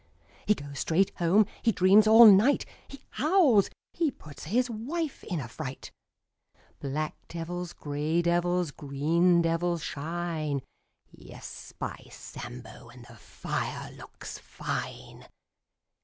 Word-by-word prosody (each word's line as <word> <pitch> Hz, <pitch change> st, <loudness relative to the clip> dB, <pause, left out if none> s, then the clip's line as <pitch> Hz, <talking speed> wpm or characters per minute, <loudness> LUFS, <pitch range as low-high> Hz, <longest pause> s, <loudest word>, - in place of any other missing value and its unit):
" -, -, -28 dB
He 210 Hz, -, +4 dB
goes 140 Hz, -4 st, -8 dB
straight 190 Hz, +4 st, +2 dB
home. 180 Hz, +5 st, +4 dB, 0.2 s
He 230 Hz, -, +3 dB
dreams 200 Hz, +3 st, +5 dB
all 225 Hz, +2 st, +9 dB
night. 215 Hz, +7 st, +6 dB, 0.2 s
He 275 Hz, -, -12 dB
howls. 295 Hz, -, +4 dB, 0.2 s
He 335 Hz, -3 st, +1 dB
puts 150 Hz, -, -12 dB
his 245 Hz, +10 st, +1 dB
wife 270 Hz, +8 st, -4 dB
in 175 Hz, -5 st, -3 dB
a 130 Hz, -, -5 dB
fright. 130 Hz, +2 st, -7 dB, 0.9 s
Black 150 Hz, +2 st, -3 dB
devils, 175 Hz, +1 st, -5 dB
grey 150 Hz, +3 st, -1 dB
devils, 175 Hz, -1 st, +1 dB
green 165 Hz, +6 st, +2 dB
devils 165 Hz, 0 st, 0 dB
shine 155 Hz, -2 st, -3 dB, 0.3 s
— -, -, -56 dB
Yes, -, -, -11 dB
by -, -, -6 dB
Sambo, 120 Hz, 0 st, -10 dB
And 120 Hz, 0 st, -14 dB
the 115 Hz, -, -14 dB
fire -, -, -5 dB
looks -, -, -10 dB
fine! -, -, -6 dB
170 Hz, 125 wpm, -28 LUFS, 150-210 Hz, 0.9 s, all